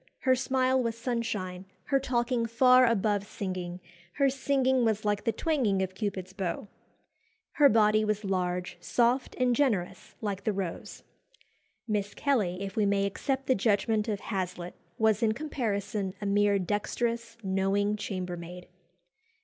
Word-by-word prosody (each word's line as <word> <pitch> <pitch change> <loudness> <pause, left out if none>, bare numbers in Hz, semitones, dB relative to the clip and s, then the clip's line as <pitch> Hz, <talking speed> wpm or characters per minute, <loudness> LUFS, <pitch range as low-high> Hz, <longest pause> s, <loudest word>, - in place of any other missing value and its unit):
Her 260 -3 +4
smile 260 0 +1
was 230 -2 -2
sunshine; 220 -7 -3 0.2
her 275 -1 +3
talking 240 -2 0
far 255 +2 +5
above 205 -2 +1
singing; 185 -3 -5 0.3
her 275 -2 +2
singing 265 -1 +1
was 220 -2 0
like 205 +1 0
the 230 - +3
twanging 225 -7 +1
of 185 0 -4
Cupid's 190 -2 -4
bow. 195 +1 -3 0.8
Her 290 -2 +5
body 215 0 +4
was 210 0 -1
large, 180 -2 -2
soft, 245 +2 +1
and 250 -1 +2
generous 220 -11 -1
like 200 -2 -3
the 215 - 0
rose. 190 -4 -5 0.8
Miss 205 -2 -2
Kelly, 200 -10 0
if 195 -1 -6
we 210 -2 +2
may 200 0 +2
accept 270 +7 -2
the 260 - +3
judgment 215 0 +1
of 205 -3 -2
Hazlitt, 180 -3 -4 0.2
was 220 0 +2
in 220 -2 +3
comparison 210 -8 -3
a 205 - -5
mere 205 0 +3
dexterous, 230 +4 -2
knowing 195 +2 +1
chambermaid. 180 -3 -6
210 Hz, 140 wpm, -29 LUFS, 195-240 Hz, 0.8 s, far